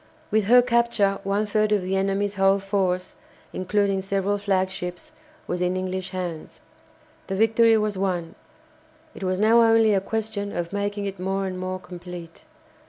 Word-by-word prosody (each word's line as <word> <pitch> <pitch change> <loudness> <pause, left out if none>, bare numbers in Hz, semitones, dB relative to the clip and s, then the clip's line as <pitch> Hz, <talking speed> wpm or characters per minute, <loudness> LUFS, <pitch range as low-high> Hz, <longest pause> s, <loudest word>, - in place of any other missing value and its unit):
With 215 -1 +2
her 245 +3 +6
capture 235 -5 +2
one 200 +2 0
third 215 0 +1
of 205 -3 +2
the 185 +1 -1
enemy's 195 +1 0
whole 195 0 +3
force, 190 -2 -1 0.4
including 195 +1 0
several 195 +1 -1
flagships, 190 - -2 0.3
was 180 0 -3
in 180 +1 0
English 185 0 -3
hands. 180 -4 -6 0.7
The 195 - -2
victory 225 +2 +4
was 210 -2 -1
won; 180 -4 -2 0.8
it - - -9
was 185 0 0
now 220 +3 +5
only 225 -1 +5
a 195 - +2
question 210 -1 -3
of 175 +2 -3
making 205 0 -2
it 195 -2 -5
more 195 +1 -1
and 185 -1 -4
more 185 0 -3
complete. 180 - -10
195 Hz, 160 wpm, -24 LUFS, 185-210 Hz, 0.8 s, her